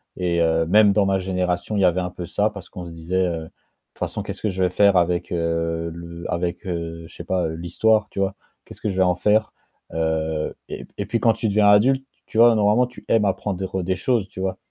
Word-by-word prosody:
et 85 Hz, -2 st, 0 dB
heu, 80 Hz, 0 st, +2 dB
même 105 Hz, +3 st, +5 dB
dans 100 Hz, -1 st, +3 dB
ma 95 Hz, -1 st, +1 dB
génération, 90 Hz, +2 st, -2 dB
il 100 Hz, -, +1 dB
y -, -, +5 dB
avait 90 Hz, +1 st, +3 dB
un 90 Hz, 0 st, -2 dB
peu 90 Hz, -1 st, -7 dB
ça 105 Hz, +5 st, 0 dB
parce 100 Hz, -3 st, -11 dB
qu'on 90 Hz, -1 st, -8 dB
se 85 Hz, -, -8 dB
disait, 90 Hz, +3 st, -1 dB
heu: 85 Hz, -2 st, -2 dB
«De -, -, -10 dB
toute -, -, -30 dB
façon -, -, -5 dB
qu'est-ce -, -, -7 dB
que 110 Hz, -, 0 dB
je 95 Hz, 0 st, -1 dB
vais 90 Hz, -, +3 dB
faire 100 Hz, +1 st, +4 dB
avec, 85 Hz, 0 st, +1 dB
heu, 85 Hz, 0 st, -1 dB
le 85 Hz, 0 st, -9 dB
avec, 85 Hz, +3 st, -2 dB
heu, 85 Hz, -2 st, -4 dB
je -, -, -17 dB
sais -, -, -8 dB
pas, 90 Hz, -3 st, 0 dB
heu, 80 Hz, -, -4 dB
l'histoire», 105 Hz, +6 st, +1 dB
tu -, -, -5 dB
vois? 95 Hz, 0 st, 0 dB, 0.3 s
«Qu'est-ce -, -, -13 dB
que 105 Hz, -, -1 dB
je 95 Hz, -, -3 dB
vais 95 Hz, -, +3 dB
en 90 Hz, -1 st, +2 dB
faire?» 105 Hz, +4 st, +2 dB, 0.4 s
heu, 80 Hz, -1 st, -1 dB
et -, -, -6 dB
p -, -, -32 dB
et 100 Hz, -, -2 dB
puis 115 Hz, +3 st, -1 dB
quand 115 Hz, -2 st, +4 dB
tu 110 Hz, 0 st, -2 dB
deviens 105 Hz, 0 st, +3 dB
adulte, 130 Hz, +6 st, +4 dB, 0.2 s
tu 110 Hz, -, -6 dB
vois? 115 Hz, 0 st, +7 dB
Normalement 110 Hz, +4 st, +3 dB
tu 125 Hz, -, -14 dB
aimes 110 Hz, -2 st, +3 dB
apprendre 95 Hz, -1 st, -2 dB
des 95 Hz, +1 st, 0 dB
choses, 110 Hz, -1 st, 0 dB
tu -, -, -10 dB
vois? 95 Hz, 0 st, -2 dB
95 Hz, 255 wpm, -22 LUFS, 85-105 Hz, 0.4 s, vois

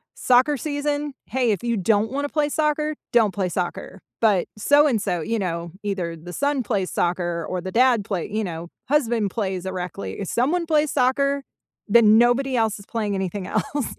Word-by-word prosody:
soccer 255 Hz, +4 st, +3 dB
season? 290 Hz, +1 st, -2 dB
"Hey, 250 Hz, -3 st, +1 dB
if 205 Hz, -, -2 dB
you 235 Hz, -1 st, 0 dB
don't 210 Hz, +3 st, +1 dB
wanna 285 Hz, +2 st, -2 dB
play 300 Hz, 0 st, 0 dB
soccer, 300 Hz, 0 st, 0 dB, 0.2 s
don't 220 Hz, -5 st, +4 dB
play 185 Hz, -1 st, -1 dB
soccer." 180 Hz, +2 st, -4 dB, 0.2 s
But, 210 Hz, -5 st, +3 dB
so 290 Hz, +7 st, +4 dB
and 230 Hz, -7 st, +1 dB
so, 175 Hz, -3 st, -1 dB
you 225 Hz, +8 st, -2 dB
know, 170 Hz, -3 st, -3 dB
either 185 Hz, -5 st, -3 dB
the 175 Hz, +3 st, -10 dB
son 285 Hz, +1 st, 0 dB
plays 200 Hz, -5 st, -1 dB
soccer, 175 Hz, -1 st, -1 dB
or 185 Hz, -, -2 dB
the 185 Hz, -, -6 dB
dad 245 Hz, -2 st, +4 dB
play 185 Hz, -5 st, -3 dB
you 215 Hz, +1 st, -1 dB
know, 170 Hz, -2 st, -6 dB, 0.2 s
husband 235 Hz, -8 st, +1 dB
plays 190 Hz, -4 st, -3 dB
a 190 Hz, -, -3 dB
rec 180 Hz, -2 st, -5 dB
league 95 Hz, -1 st, -6 dB
if 195 Hz, -, -4 dB
someone 315 Hz, +9 st, +1 dB
plays 305 Hz, -2 st, +2 dB
soccer, 275 Hz, +1 st, +1 dB, 0.5 s
then 220 Hz, 0 st, +6 dB
nobody 245 Hz, +3 st, +3 dB
else 220 Hz, -2 st, 0 dB
is 200 Hz, -, -13 dB
playing 210 Hz, -3 st, -2 dB
anything 190 Hz, 0 st, -3 dB
else. 285 Hz, -4 st, -1 dB
225 Hz, 195 wpm, -23 LUFS, 185-275 Hz, 0.5 s, then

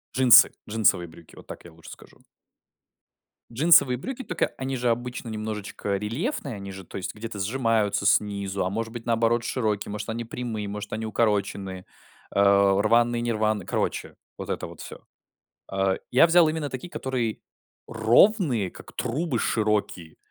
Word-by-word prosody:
Джинсы, 130 Hz, -2 st, +7 dB, 0.2 s
джинсовые 105 Hz, -5 st, +2 dB
брюки- 80 Hz, 0 st, -16 dB
вот -, -, -15 dB
так -, -, -10 dB
я 85 Hz, -, -12 dB
лучше 80 Hz, 0 st, -14 dB
скажу. -, -, -15 dB, 1.3 s
Джинсовые 130 Hz, -1 st, +5 dB
брюки, 260 Hz, -, -6 dB
тока, 180 Hz, -8 st, -2 dB
они 130 Hz, 0 st, -3 dB
же 120 Hz, 0 st, 0 dB
обычно 120 Hz, +1 st, -4 dB
немножечко 105 Hz, -2 st, -4 dB
рельефные, 130 Hz, -, -3 dB
они 100 Hz, -1 st, -8 dB
же, 95 Hz, 0 st, -9 dB
то -, -, -8 dB
есть, 95 Hz, -, -5 dB
где-то 110 Hz, -1 st, -7 dB
сжимаются 110 Hz, -1 st, 0 dB
снизу, 100 Hz, -2 st, +1 dB
а 90 Hz, -, -1 dB
может 110 Hz, +3 st, -4 dB
быть, 120 Hz, -1 st, -8 dB
наоборот, 115 Hz, 0 st, +2 dB
широкие, 110 Hz, -5 st, -2 dB
может 105 Hz, -, -5 dB
они 115 Hz, +1 st, -3 dB
прямые, 115 Hz, -3 st, -5 dB
может 105 Hz, 0 st, -6 dB
они 110 Hz, +1 st, -3 dB
укороченные, 100 Hz, -4 st, -1 dB, 0.5 s
э, -, -, +2 dB
рваные, 100 Hz, +4 st, +3 dB
не 120 Hz, -, 0 dB
рваные. 110 Hz, -3 st, 0 dB
Короче, -, -, -3 dB, 0.2 s
вот -, -, -7 dB
это -, -, -4 dB
вот -, -, -12 dB
всё. -, -, -9 dB, 0.7 s
Э, 95 Hz, 0 st, +1 dB, 0.2 s
я 130 Hz, +7 st, +6 dB
взял 170 Hz, -1 st, +5 dB
именно 155 Hz, -2 st, -3 dB
такие, 130 Hz, +7 st, -6 dB
которые 125 Hz, -8 st, -3 dB, 0.5 s
ровные, 115 Hz, -, +3 dB
как -, -, -14 dB
трубы, 130 Hz, 0 st, -2 dB
широкие. 105 Hz, -7 st, -1 dB
110 Hz, 155 wpm, -25 LUFS, 100-125 Hz, 1.3 s, Джинсы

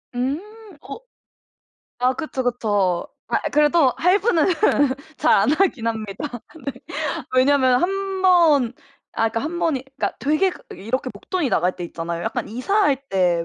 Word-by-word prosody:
음. 265 Hz, +5 st, -1 dB, 0.4 s
어 280 Hz, +11 st, -8 dB, 1.0 s
아 250 Hz, +1 st, +2 dB
그쵸, 270 Hz, -2 st, -4 dB
그쵸. 205 Hz, -7 st, 0 dB, 0.2 s
아 -, -, +1 dB
그래도 295 Hz, -2 st, +4 dB
할부는 365 Hz, -2 st, +3 dB, 0.7 s
잘 315 Hz, 0 st, +3 dB
안 205 Hz, +3 st, +4 dB
하긴 305 Hz, -10 st, +1 dB
합니다. 225 Hz, +3 st, -4 dB, 0.3 s
네. 275 Hz, -, -1 dB, 0.6 s
왜냐하면 260 Hz, -1 st, +4 dB
1 355 Hz, -, +3 dB, 0.3 s
번 315 Hz, -10 st, +4 dB, 0.4 s
아 225 Hz, -, +2 dB
그러니까 230 Hz, +1 st, -3 dB
1 335 Hz, +4 st, -4 dB
번이 275 Hz, -6 st, 0 dB
그러니까 -, -, -2 dB
되게 310 Hz, +7 st, +2 dB
그 -, -, -12 dB, 0.2 s
이렇게 255 Hz, +6 st, -3 dB
목돈이 305 Hz, -, -2 dB
나갈 180 Hz, -2 st, +1 dB
때 175 Hz, -, -5 dB
있잖아요. 170 Hz, 0 st, -5 dB
약간 -, -, -3 dB
이사할 285 Hz, -, +1 dB
때 175 Hz, -3 st, +1 dB
260 Hz, 270 characters per minute, -22 LUFS, 220-310 Hz, 1.0 s, 그래도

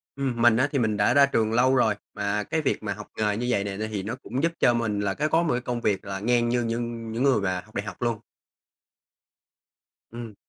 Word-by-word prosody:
Ừm, 130 Hz, -4 st, -2 dB
mình 115 Hz, -1 st, +5 dB
á 130 Hz, -, +3 dB
thì 140 Hz, -, 0 dB
mình 110 Hz, -3 st, 0 dB
đã 100 Hz, -, +3 dB
ra 140 Hz, 0 st, +7 dB
trường 115 Hz, -5 st, 0 dB
lâu 130 Hz, +3 st, +4 dB
rồi, 110 Hz, -5 st, +3 dB, 0.2 s
mà 105 Hz, 0 st, -1 dB
cái 160 Hz, +10 st, -1 dB
việc 140 Hz, -, -1 dB
mà 100 Hz, -2 st, -2 dB
học 105 Hz, +1 st, -10 dB
nghề 105 Hz, -1 st, 0 dB
như 120 Hz, -, -2 dB
vầy 100 Hz, -5 st, +1 dB
nè 100 Hz, -, -4 dB
ấy 110 Hz, +1 st, -3 dB
thì 105 Hz, -3 st, -4 dB
nó 115 Hz, +4 st, -4 dB
cũng 130 Hz, +1 st, -5 dB
giúp 165 Hz, -, +2 dB
cho 120 Hz, -, +4 dB
mình 115 Hz, -3 st, -1 dB
là 100 Hz, -1 st, 0 dB
cái 150 Hz, +8 st, -1 dB
có 165 Hz, +2 st, +3 dB
một 165 Hz, -, +1 dB
cái 125 Hz, -, -1 dB
công 120 Hz, -1 st, -3 dB
việc 100 Hz, -4 st, 0 dB
là 95 Hz, 0 st, -4 dB
ngang 120 Hz, +2 st, +1 dB
như 120 Hz, 0 st, +1 dB
nhưng 115 Hz, 0 st, -4 dB
những 115 Hz, +3 st, -1 dB
người 135 Hz, -6 st, +3 dB
mà 95 Hz, -2 st, -1 dB
học 110 Hz, -, -22 dB
đại 100 Hz, -, -2 dB
học 100 Hz, -, -8 dB
luôn. 120 Hz, -3 st, 0 dB, 1.9 s
Ừm. 115 Hz, -3 st, -8 dB
115 Hz, 260 wpm, -25 LUFS, 105-125 Hz, 1.9 s, ra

